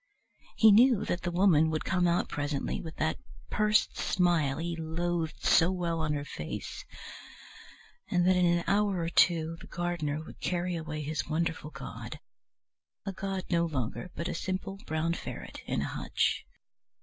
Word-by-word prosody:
He 220 -1 +7
knew 235 +1 +6
that 175 - -1
the 175 - -2
Woman 175 -3 +4
would 155 -1 -2
come 180 -2 +2
out 170 +1 +2
presently 145 -1 -2
with 160 -2 -8
that 155 0 0 0.3
pursed 215 0 +2
smile 170 -7 +2
he 170 +1 -2
loathed 165 0 -2
so 165 +3 +5
well 170 -3 -1
on 155 -1 0
her 145 -1 -3
face, 75 - -6 1.3
and 175 0 +2
that 185 0 +5
in 180 -1 +4
an 170 0 +2
hour 200 -1 +2
or 165 - -1
two 165 -1 +3
the - - -11
gardener 170 -4 -2
would - - -12
carry 175 0 -1
away 155 -2 -4
his 150 +1 -3
wonderful 165 -1 -1
god, 140 -3 -8 0.9
a 195 - -3
god 190 0 -3
no 170 -1 +3
longer, 140 +3 -3
but 170 - -3
a - - -2
simple 190 +1 -3
brown 160 +2 0
ferret - - -7
in - - 0
a - - -2
hutch. - - -1
170 Hz, 165 wpm, -30 LUFS, 155-180 Hz, 1.3 s, He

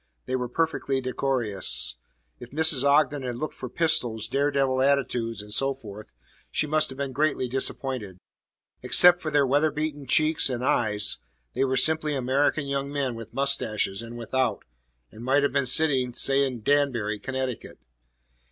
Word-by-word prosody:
They 130 - -3
were 125 -1 -3
perfectly 140 -2 -1
decorous. 125 -6 -1 0.4
If 120 - -11
Mrs. 150 -2 +3
Ogden 145 0 +2
had 125 -2 -5
looked 155 +6 -5
for 125 - -8
pistols, 120 -9 +1
dare 140 +1 0
devil 135 -2 0
attitudes, 120 -6 -1
and 105 0 -7
so 135 +3 +1
forth, 110 -4 -12 0.4
she - - -1
must 155 +1 +3
have 130 - -9
been 140 -1 -4
greatly 145 -1 -1
disappointed. 130 -5 -1 0.6
Except 175 0 +7
for 160 - -4
their 145 -2 +2
weather 145 +4 +2
beaten 150 -2 -5
cheeks 155 -2 +3
and 125 0 -3
eyes, 105 - +1 0.3
they - - 0
were 130 0 -1
simply 155 -2 +2
American 135 +3 0
young 140 0 -3
men 140 -3 -2
with 115 -1 -10
mustaches 110 -7 0
and 115 0 -9
without, 130 +2 -2 0.5
and 110 - -12
might 135 +3 +2
have 145 - 0
been 140 -2 +1
sitting, 130 -3 +2
say, 140 0 +3
in 120 -4 -7
Danbury, 120 -7 0
Connecticut. 130 +1 -5
135 Hz, 160 wpm, -25 LUFS, 120-145 Hz, 0.6 s, Except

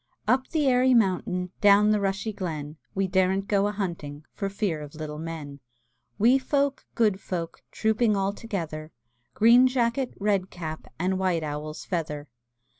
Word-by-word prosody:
Up 260 +3 +2
the 310 -3 0
airy 255 0 +4
mountain, 180 -4 +1
Down 205 0 +6
the 210 - +3
rushy 200 +2 -1
glen, 155 -6 -5 0.2
We 195 0 +1
daren't 190 +1 +1
go 200 -1 +2
a - - -1
hunting 165 -7 -5
For 195 - -3
fear 195 -6 -2
of 150 +1 -9
little 150 -1 -6
men; 155 -3 -6 0.6
Wee 245 +5 +5
folk, 280 +1 0
good 210 -5 +2
folk, 170 -3 -5
Trooping 220 0 +2
all 195 +1 0
together; 165 -8 -5 0.4
Green 240 +4 +7
jacket, 255 0 0
red 200 -2 +1
cap, 160 -3 -7
And 185 +2 0
white 180 -4 +1
owl's 150 +1 -5
feather! 150 -4 -3
195 Hz, 155 wpm, -26 LUFS, 160-220 Hz, 0.6 s, Green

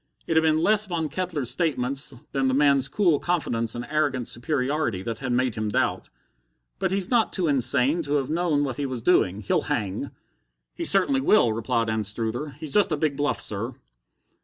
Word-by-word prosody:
It 165 - -1
had 160 - +5
been 160 -1 +2
less 210 +5 +3
Von 165 -4 -2
Kettler's 155 -7 -2
statements 140 -2 0 0.2
than 135 -1 0
the 130 - +1
man's 140 -2 +3
cool 170 -1 +2
confidence 120 -10 -1
and 120 +1 -5
arrogant 145 -5 0
superiority 130 -5 -1
that 115 0 -4
had 130 -2 -3
made 125 0 +1
him 110 0 -3
doubt. - - -1 0.7
"But - - 0
he's 195 +2 -2
not 235 -3 +3
too 180 -4 -1
insane 140 +3 +2
to 145 -2 -3
have 140 -3 +1
known 160 -3 0
what 130 -3 -3
he 145 - -2
was 125 -3 -5
doing. 105 - +2
He'll 100 - +1
hang." 105 -10 -2 0.6
"He - - -5
certainly 265 +8 +3
will," 210 - +4
replied 115 +1 -1
Anstruther. 110 +5 -2
"He's 155 -3 -4
just 205 -4 +4
a 155 - +1
big 145 -1 0
bluff, 145 +1 -1
sir." 115 +5 -2
140 Hz, 185 wpm, -25 LUFS, 120-160 Hz, 0.7 s, had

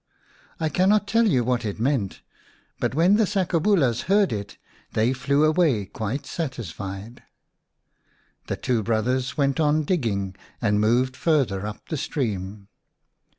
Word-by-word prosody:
I 160 - 0
cannot 200 +6 +3
tell 230 +2 +3
you 130 - +2
what 125 0 0
it 105 -1 -4
meant, 120 - -1 0.6
but - - -1
when 180 +6 +4
the 220 -2 +3
sakobulas 175 - +1
heard 200 - +3
it, 100 -1 -6 0.4
they 115 +4 +2
flew 140 +3 +1
away 155 - +2
quite 110 +8 -4
satisfied. 110 - -6 1.3
The - - -2
two 120 -3 0
brothers 125 +5 -1
went 140 0 +1
on 155 0 +3
digging, 105 - -1 0.2
and 105 -3 +1
moved 125 +4 +2
farther 130 - +1
up 105 - -9
the 155 - -2
stream. 100 -8 -3
130 Hz, 135 wpm, -24 LUFS, 110-160 Hz, 1.3 s, when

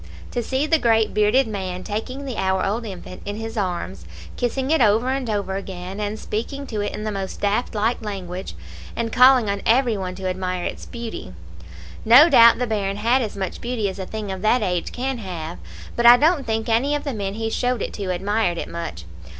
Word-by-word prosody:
To 245 - -1
see 265 +5 -1
the 320 +1 +3
great 225 -3 +2
bearded 215 +6 +3
man 185 -3 -4
taking 255 +6 -4
the 255 -5 -5
hour 190 0 +1
old 225 +4 -2
infant 185 -2 -9
in 205 0 -4
his 225 +1 -6
arms, 175 - -3 0.3
kissing 260 +3 -1
it 320 - +3
over 225 +3 +3
and 265 -3 -2
over 200 -2 -1
again, 190 0 -7
and 210 +1 -2
speaking 255 +7 -4
to 220 -5 -3
it 205 - -3
in 215 - -5
the 215 - -2
most 195 -2 -5
daft 210 +3 0
like 220 +3 0
language, 185 - -6 0.4
and 230 -1 -2
calling 250 -2 +6
on 200 0 -1
every 235 0 +3
one 185 -1 -4
to 190 0 -4
admire 185 -1 -2
its - - -5
beauty! 230 - -7 0.7
No 255 +9 +8
doubt 235 -5 +7
the 250 - 0
bairn 200 -3 -2
had 235 +5 +2
as 215 -4 -4
much 190 -1 -4
beauty 235 -3 -1
as 190 - -8
a 190 - -5
thing 215 -2 -5
of 190 -1 -5
that 220 +3 +3
age 180 -3 -1
can 260 0 -3
have, 175 -4 -6 0.4
but 235 0 +4
I 240 +1 +10
don't 300 -1 +2
think 220 0 -1
any 245 +6 +2
of 290 - -3
the 280 - -3
men 200 -2 -3
he 225 0 -3
showed 245 -2 0
it - - -5
to 200 -3 -4
admired 190 0 0
it - - -4
much. 90 - -6
215 Hz, 215 wpm, -22 LUFS, 190-245 Hz, 0.7 s, I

